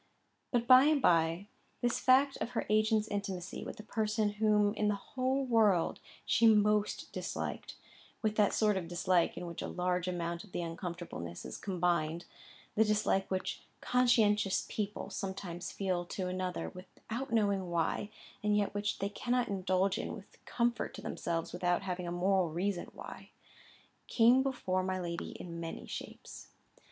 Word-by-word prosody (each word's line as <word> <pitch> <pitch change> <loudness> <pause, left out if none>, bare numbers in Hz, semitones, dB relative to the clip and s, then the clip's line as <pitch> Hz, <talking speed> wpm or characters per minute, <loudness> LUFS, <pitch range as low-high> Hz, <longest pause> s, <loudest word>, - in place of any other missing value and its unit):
But 240 -2 +1
by 255 +2 +8
and 305 -1 +4
by 165 -3 +3 0.4
this 240 -1 +1
fact 270 +2 +4
of - - -3
her - - 0
agent's 215 0 +3
intimacy 195 -3 -4
with - - -7
the 215 - -9
person 215 -1 0
whom 210 -1 +2
in 210 -1 0
the 210 - +2
whole 260 +6 -1
world 215 -8 +3 0.3
she 230 - +4
most 210 -1 +3
disliked - - -4 0.5
(with 215 -1 +1
that 210 -2 +4
sort 210 -2 +2
of 175 -3 -3
dislike 175 0 +1
in - - -4
which 170 -1 -6
a - - -3
large 180 0 -1
amount 170 -1 -3
of 200 - -14
uncomfortableness 170 - -5
is - - -6
combined—the 175 +2 -1
dislike 210 -2 +1
which 185 -1 -2 0.2
conscientious 220 -6 +3
people 210 -1 -4
sometimes 190 -3 -5
feel 185 -3 -1
to 185 +1 -4
another 185 0 -3
without 225 +7 -7
knowing 200 -5 +1
why, 170 +4 0 0.3
and 210 0 +2
yet 205 -1 0
which 205 0 -1
they 200 - -2
cannot 245 +3 -1
indulge 190 0 +1
in - - -4
with 200 -2 -15
comfort 235 -1 -1
to - - -9
themselves 165 -1 -3
without 175 +1 0
having 180 -2 -3
a - - -3
moral 185 0 +2
reason 175 +3 -2
why), - - -9 0.8
came 240 +3 +5
before 245 -9 -1
my 185 0 -2
lady 170 -1 -4
in 170 -1 -7
many 165 -1 -6
shapes. - - -8
195 Hz, 155 wpm, -33 LUFS, 180-215 Hz, 0.8 s, by